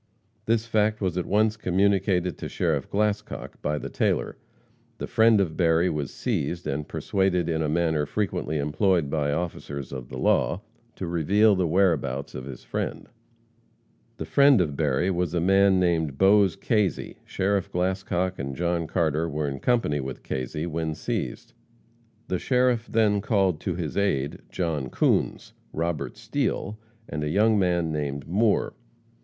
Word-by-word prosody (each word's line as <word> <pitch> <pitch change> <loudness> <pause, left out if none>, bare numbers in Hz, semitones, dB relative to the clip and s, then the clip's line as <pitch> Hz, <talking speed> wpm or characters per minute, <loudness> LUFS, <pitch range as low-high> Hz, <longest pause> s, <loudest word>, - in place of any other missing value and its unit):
This 115 0 +2
fact 110 -1 +1
was 95 -4 -1
at 90 - -2
once 110 +2 +2
communicated 95 -2 +1
to - - -5
Sheriff - - -1
Glascock 105 0 -2
by 75 0 -1
the - - -5
tailor. - - 0 0.6
The - - -4
friend 110 -1 +4
of 85 -5 0
Berry 85 0 +3
was 75 -3 -3
seized, 85 +5 -2
and 75 0 -3
persuaded 95 -3 0
in 80 -1 0
a 75 - 0
manner 80 -2 +1
frequently 85 -6 -2
employed 75 +1 +1
by 75 -2 0
officers 70 -4 -4
of 65 -3 -7
the - - -7
law, 90 - +1 0.3
to 95 - -5
reveal 95 +6 +3
the 90 -2 +1
whereabouts 80 -7 +1
of 65 - -6
his 65 -3 -9
friend. - - -4 1.1
The - - -4
friend 140 -4 +5
of 75 -6 0
Berry 75 +5 +1
was 90 -1 -1
a - - +2
man 95 +2 +4
named 80 -6 +1
Bose 100 -1 +5
Kazy. 105 -5 -1
Sheriff 95 0 -1
Glascock 95 0 -1
and 70 -1 -4
John 85 0 -1
Carter 80 -1 0
were 75 0 -2
in 70 -1 -4
company 115 - +1
when 65 -1 -4
Kazy 65 +5 -4
was 80 -2 -3
seized. - - -4 0.7
The 90 - -1
sheriff 125 -2 +1
then 105 -2 +2
called 95 -6 +1
to 90 - -2
his 85 -4 -4
aid 70 -9 0
John 80 -7 -2
Coons, - - 0 0.2
Robert 85 -1 -3
Steele, 105 +2 -2 0.3
and 75 0 -4
a 75 - -1
young 105 +5 +3
man 85 -3 +1
named 70 -2 -3
Moore. 105 +5 +1
90 Hz, 155 wpm, -25 LUFS, 75-100 Hz, 1.1 s, friend